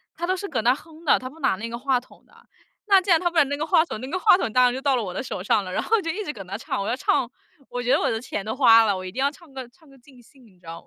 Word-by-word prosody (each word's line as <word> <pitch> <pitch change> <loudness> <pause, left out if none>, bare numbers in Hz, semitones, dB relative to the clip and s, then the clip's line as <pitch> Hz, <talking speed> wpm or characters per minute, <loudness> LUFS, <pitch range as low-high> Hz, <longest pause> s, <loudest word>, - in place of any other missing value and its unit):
他 345 - -4
都 370 - +1
是 400 +2 -6
搁 250 -10 -2
那 245 +3 +3
哼 320 +2 -16
的， - - +5
他 255 0 -7
不 320 +4 -17
拿 190 - +1
那 230 +4 -6
个 235 - -5
话 265 -1 +1
筒 250 - -21
的。 - - -28 0.6
那 390 - +8
既 375 0 -2
然 325 - +5
他 350 - +1
不 340 - -6
拿 310 - +7
那 285 +1 -3
个 305 +2 -3
话 335 -1 +3
筒， 220 - -7
那 260 - -6
个 370 +3 -2
话 415 - +6
筒 225 - -3
当 250 +1 +4
然 245 - +2
就 265 - -5
到 275 -2 +2
了 235 - -1
我 180 -2 -6
的 260 - -3
手 185 -7 -6
上 205 0 +1
了， 185 - -7
然 - - -1
后 450 -2 +1
就 330 - -4
一 425 +4 -4
直 300 - -4
跟 195 -5 -10
着 200 +2 -5
唱。 210 - -4
我 200 - -4
要 245 - 0
唱， 260 -2 0 0.4
我 245 - -4
觉 245 - 0
得 - - +3
我 - - 0
的 225 - -2
钱 205 -4 -5
都 220 +4 -4
花 230 -4 +6
了， 200 -3 0
我 185 - -7
一 185 - -6
定 260 - -7
要 280 - +3
唱 320 -2 -19
个 260 -2 -7
唱 315 +4 -25
个 275 -1 -19
尽 250 -1 -19
兴， 260 +1 -22
你 185 -5 -23
知 180 - -24
道 165 0 -9
255 Hz, 400 characters per minute, -23 LUFS, 225-315 Hz, 0.6 s, 那